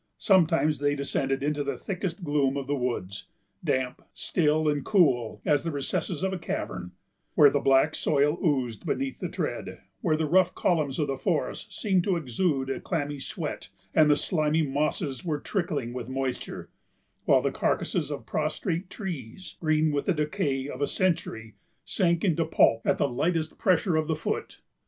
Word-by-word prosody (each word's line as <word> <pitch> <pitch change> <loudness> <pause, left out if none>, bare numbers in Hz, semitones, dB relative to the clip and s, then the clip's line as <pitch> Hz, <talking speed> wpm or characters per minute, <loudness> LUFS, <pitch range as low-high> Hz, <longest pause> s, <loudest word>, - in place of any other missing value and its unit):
Sometimes 165 -6 +3
they 145 0 +1
descended 135 -1 -1
into 145 0 0
the 140 -2 -3
thickest 180 -2 -4
gloom 145 -3 +1
of 140 - -3
the 145 +2 -1
woods, 120 -7 -3 0.4
damp, 130 -1 -1
still, 155 -2 +1
and 145 -2 +1
cool 130 - +2
as 145 -1 +3
the 165 - -2
recesses 145 +3 -2
of 190 0 0
a 185 - -3
cavern, 90 - -4 0.4
where 145 -2 +7
the 145 - +2
black 135 -1 +4
soil 150 +2 +1
oozed 130 - 0
beneath 270 0 -2
the - - -3
tread, - - -4 0.2
where 160 -8 +2
the 160 - 0
rough 180 +3 +3
columns 155 -7 +1
of 150 - +1
the 135 -1 -3
forest 170 -6 -2
seemed 190 -4 +2
to 190 -1 +1
exude 135 -1 0
a - - -3
clammy 145 -4 -3
sweat, - - -5 0.2
and 155 -1 +5
the 145 - +5
slimy 155 -1 +1
mosses 145 +1 -1
were 155 -4 -1
trickling 145 - -2
with 125 -1 -5
moisture; 130 -1 -4 0.5
while - - +4
the - - +1
carcasses - - 0
of - - -5
prostrate 175 +3 -2
trees, 175 - -7
green 155 -1 +2
with 145 -1 -2
the 190 - +4
decay 150 -4 -1
of 140 -1 -7
a 145 - +2
century, 165 - -1 0.3
sank 170 -4 +1
into 170 -4 +2
pulp 115 -7 +3
at - - +3
the - - +2
lightest 160 +5 -1
pressure 180 -2 +2
of 155 -1 0
the 160 - +1
foot. 155 - -4
150 Hz, 175 wpm, -27 LUFS, 135-170 Hz, 0.5 s, where